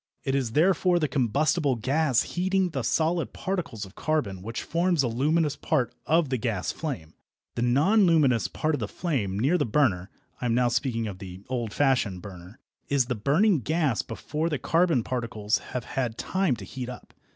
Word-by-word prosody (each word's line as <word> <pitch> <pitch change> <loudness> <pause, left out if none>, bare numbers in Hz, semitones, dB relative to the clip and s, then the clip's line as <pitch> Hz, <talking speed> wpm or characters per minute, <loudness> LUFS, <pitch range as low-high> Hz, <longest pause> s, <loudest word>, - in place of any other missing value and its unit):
It 135 - -1
is 130 -5 -1
therefore 180 +2 +3
the 155 -3 +1
combustible 140 +3 +1
gas 135 +3 +1
heating 190 +1 0
the 135 -4 -2
solid 165 +7 0
particles 170 - -3
of 95 - -14
carbon 145 -13 -1
which 115 +4 -5
forms 170 0 +1
the 130 - +1
luminous 145 +5 +1
part 135 -5 0
of 160 -1 +3
the 130 -2 -1
gas 110 -6 -1
flame. 130 - -5 0.4
The - - -3
non 155 - +4
luminous 140 -9 +3
part 155 0 -1
of 145 - 0
the - - -2
flame, 120 - -2
near 140 +11 +2
the - - +2
burner 105 -8 +1 0.3
(I - - -2
am 115 - +1
now 125 0 +3
speaking 120 -2 -1
of 100 -4 -6
the 95 0 -9
old 120 -4 -2
fashioned 120 -9 +1
burner), 95 +1 -11 0.3
is 140 -3 +3
the 125 - -1
burning 150 - +3
gas 150 -2 0
before 155 +8 -3
the 150 - -1
carbon 165 -2 +2
particles 115 -2 -1
have 125 - -5
had 120 -3 -3
time 185 -8 0
to 100 -3 -9
heat 125 +4 -6
up. 125 - -10
135 Hz, 185 wpm, -26 LUFS, 115-160 Hz, 0.4 s, non